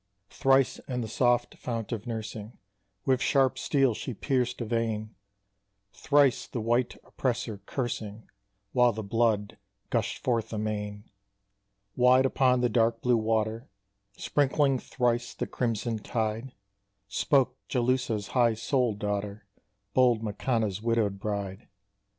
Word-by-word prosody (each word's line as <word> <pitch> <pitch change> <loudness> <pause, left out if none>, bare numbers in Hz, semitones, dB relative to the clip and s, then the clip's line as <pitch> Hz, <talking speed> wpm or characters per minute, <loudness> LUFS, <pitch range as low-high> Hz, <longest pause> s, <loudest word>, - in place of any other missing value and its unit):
Thrice 135 -1 +3
in 125 -2 -2
the 115 - -3
soft 120 +2 +1
fount 115 -2 -4
of 110 -2 -4
nursing 110 -1 -6 0.5
With 130 -1 +2
sharp 130 -1 +2
steel 135 -4 +2
she 120 +2 -5
pierced 125 0 -1
a 120 - -2
vein, 110 -1 -2 0.8
Thrice 140 -3 +3
the 120 - -4
white 120 +2 0
oppressor 120 -5 -2
cursing, 110 -4 -4 0.5
While 125 -2 +4
the 110 +1 -5
blood 105 -1 0 0.3
gushed 115 -2 -1
forth 115 -3 0
amain, 105 -1 -3 0.9
Wide 125 +1 +5
upon 130 -1 +3
the 125 - +3
dark 115 0 +1
blue 125 -1 +4
water, 110 +2 -1 0.5
Sprinkling 140 -1 +2
thrice 120 -1 -1
the - - -2
crimson 115 -2 -2
tide, 110 +3 -3 0.5
Spoke 130 +4 +2
Jalúhsa's 125 -4 0
high 120 -3 +3
souled 120 -1 0
daughter, 105 0 -3 0.5
Bold 120 -3 +4
Makanna's 110 -2 -1
widowed 110 -4 0
bride. 100 -1 -4
115 Hz, 120 wpm, -28 LUFS, 110-125 Hz, 0.9 s, Wide